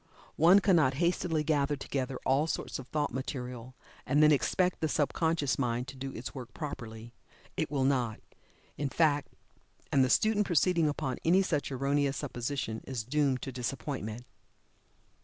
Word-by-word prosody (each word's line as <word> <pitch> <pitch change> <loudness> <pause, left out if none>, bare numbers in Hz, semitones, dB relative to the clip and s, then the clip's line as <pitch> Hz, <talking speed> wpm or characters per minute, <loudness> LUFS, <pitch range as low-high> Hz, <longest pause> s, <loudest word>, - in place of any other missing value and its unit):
One 180 +6 +7
cannot 160 -10 +4
hastily 170 0 +1
gather 145 -1 +1
together 135 -1 -3
all 140 +4 +2
sorts - - -3
of 130 - -9
thought 145 -1 -1
material, 125 -2 -5 0.3
and 145 +2 +3
then 155 - +7
expect 180 +7 +1
the 160 - 0
subconscious 150 -1 0
mind 125 -1 -1
to 135 - -9
do 135 +1 -5
its 120 - -6
work 125 -2 -9
properly 120 -6 -7 0.4
it - - -1
will 140 -2 0
not, 125 -5 +1 0.6
in 145 -1 -1
fact, 145 -1 +2 0.6
and 135 -2 +4
the 130 - +1
student 210 +5 +3
proceeding 170 -2 +3
upon 130 -3 -3
any 185 +4 +4
such 150 -6 -1
erroneous 140 +1 0
supposition 125 -4 -3
is 125 -4 -3
doomed 135 +1 0
to 135 - -4
disappointment. 125 -2 -4
140 Hz, 155 wpm, -30 LUFS, 130-155 Hz, 0.6 s, One